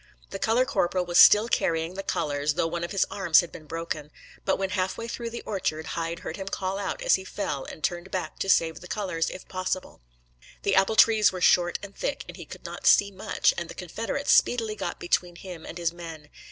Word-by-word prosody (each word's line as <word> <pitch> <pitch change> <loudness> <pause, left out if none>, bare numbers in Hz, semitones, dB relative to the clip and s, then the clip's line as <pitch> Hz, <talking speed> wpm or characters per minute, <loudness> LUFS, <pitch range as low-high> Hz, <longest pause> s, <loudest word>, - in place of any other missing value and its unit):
The - - -5
color 235 +3 +3
corporal 185 -9 0
was 175 0 +3
still 210 +2 +8
carrying 165 -5 0
the 195 - -4
colors, 150 -4 -1
though - - +1
one 170 +1 -3
of 170 - -3
his 195 - +2
arms 190 -5 +4
had 175 - -9
been 155 - -11
broken; 165 -2 -4 0.4
but 190 - +2
when 195 -1 -2
half 190 -1 -1
way 230 - -5
through 235 0 -4
the 235 - -7
orchard, 160 -6 -2
Hyde 165 0 -3
heard - - -6
him 195 -1 -6
call 195 0 -2
out 200 - -3
as - - +4
he 190 - +2
fell, 150 -8 -4
and 155 - -10
turned 175 +2 -2
back 185 - -4
to 195 - -2
save 165 -3 +3
the 180 - -11
colors, 180 -6 -2
if 185 - -9
possible. 185 - -4 0.6
The 200 - +1
apple 195 +3 +3
trees 220 -1 +6
were 185 - -5
short 175 -1 +4
and 200 0 -9
thick, - - -3
and - - -9
he - - -9
could - - -11
not - - -4
see 200 0 +6
much, 190 - +1
and 170 - -6
the - - -8
Confederates 225 - -2
speedily 225 -3 +3
got 205 - -4
between 175 0 0
him 175 -2 -9
and 170 - -7
his 170 -1 -1
men. 165 -3 -10
185 Hz, 230 wpm, -26 LUFS, 165-200 Hz, 0.6 s, still